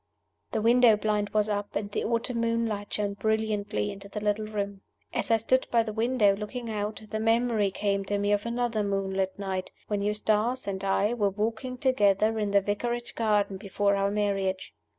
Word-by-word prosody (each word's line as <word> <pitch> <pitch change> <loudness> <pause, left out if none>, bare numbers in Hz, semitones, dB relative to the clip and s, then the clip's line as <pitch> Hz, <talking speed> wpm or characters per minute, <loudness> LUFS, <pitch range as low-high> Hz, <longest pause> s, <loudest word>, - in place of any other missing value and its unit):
The 220 -2 -1
window 235 -1 +6
blind 210 -1 0
was 210 0 +1
up, 205 -1 -3
and 205 0 -2
the - - -1
autumn 230 +1 0
moonlight 230 -3 -1
shone 205 -1 -1
brilliantly 210 -1 -1
into 200 0 -10
the 210 - -4
little 210 +1 0
room. 200 -2 -4 0.3
As - - -2
I 225 - +5
stood 260 +4 +1
by 230 -1 +3
the 215 -1 -5
window, 225 -3 +3
looking 225 +3 -5
out, 210 +1 -3
the 215 - -1
memory 225 -2 +2
came 200 0 -1
to 205 +1 -1
me 205 0 0
of 205 +2 +1
another 235 -2 0
moonlight 195 -1 -1
night, 190 -2 -3 0.2
when 205 -1 0
Eustace 215 +4 0
and 195 -1 -4
I 200 +3 +2
were 210 -4 +1
walking 225 +5 -3
together 220 -4 +2
in 210 -1 0
the 200 0 +4
Vicarage 235 +4 -2
garden 205 -3 +1
before 200 0 0
our 195 0 +1
marriage. 195 -2 -1
210 Hz, 185 wpm, -28 LUFS, 200-225 Hz, 0.3 s, window